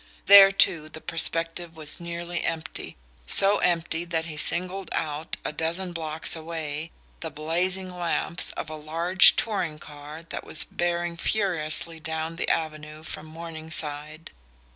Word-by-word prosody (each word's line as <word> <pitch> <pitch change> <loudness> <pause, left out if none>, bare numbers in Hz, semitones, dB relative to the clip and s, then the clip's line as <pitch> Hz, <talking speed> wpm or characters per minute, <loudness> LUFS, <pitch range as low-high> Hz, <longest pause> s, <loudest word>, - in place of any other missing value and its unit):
There 195 -1 +9
too 165 -5 +2
the 160 - -10
perspective 165 +1 0
was 150 -2 -3
nearly 170 0 -5
empty, 160 - -5 0.3
so 200 - +8
empty 170 -1 -1
that 165 -2 -3
he 160 -2 -8
singled 185 +4 +1
out, 155 +1 -3
a - - -3
dozen 170 +4 0
blocks 160 -1 0
away, 160 -1 -6 0.3
the 160 - -5
blazing 180 +5 -2
lamps 170 0 -1
of - - -6
a - - -6
large 165 +5 +5
touring 185 -9 -1
car 150 +1 -11
that - - -6
was 155 - +1
bearing 175 0 -3
furiously 170 -5 -1
down 160 +1 -5
the - - -2
avenue 155 -1 -4
from 160 0 -8
Morningside. 155 -1 -6
165 Hz, 140 wpm, -25 LUFS, 155-175 Hz, 0.3 s, There